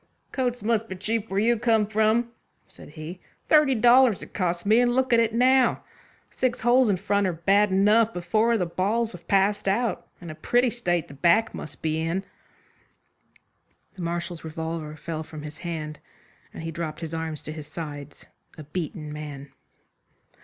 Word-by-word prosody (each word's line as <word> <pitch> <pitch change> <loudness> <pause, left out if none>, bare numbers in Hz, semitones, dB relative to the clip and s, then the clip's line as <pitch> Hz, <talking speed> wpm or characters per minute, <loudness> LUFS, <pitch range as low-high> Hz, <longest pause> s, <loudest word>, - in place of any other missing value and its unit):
"Coats 245 -4 -2
must 225 0 +1
be 190 - -5
cheap 215 +3 -2
where 195 - 0
you 230 +2 +2
come 225 -2 +3
from," 220 +3 +1 0.4
said - - -14
he. 155 +4 -8 0.3
"Thirty 300 -4 +5
dollars 240 -1 +5
it - - -13
cost 175 -1 -1
me, 220 +3 +5
and 245 0 +2
look 260 -1 +2
at 235 - +6
it 230 -1 +2
now. 255 +3 +3 0.5
The - - -29
six 250 -1 0
holes 245 0 +4
in 195 - +2
front 200 +2 +1
are 180 - -1
bad 200 +5 +3
enough, 210 +4 +3
but 175 -1 -5
four 220 +6 +2
of - - +3
the 180 - 0
balls 210 +7 0
have 180 -2 -12
passed 200 +1 +2
out, 210 +1 0
and 170 -2 -8
a - - -7
pretty 245 +9 +1
state 175 -9 -1
the - - -12
back 175 +11 +3
must 145 -2 -9
be 160 0 0
in." 170 +4 -2 1.7
The 190 - -9
Marshal's 170 0 -4
revolver 160 -1 -5
fell 155 0 -5
from 155 -1 -9
his 150 +1 -9
hand, 155 -3 -5 0.5
and - - -9
he 165 - -4
dropped 160 -1 -5
his 165 -1 -5
arms 160 -2 -4
to 155 - -6
his 155 -1 -8
sides, 145 -3 -8 0.3
a 155 - -8
beaten 155 -1 -5
man. 145 -2 -8
190 Hz, 185 wpm, -25 LUFS, 160-230 Hz, 1.7 s, at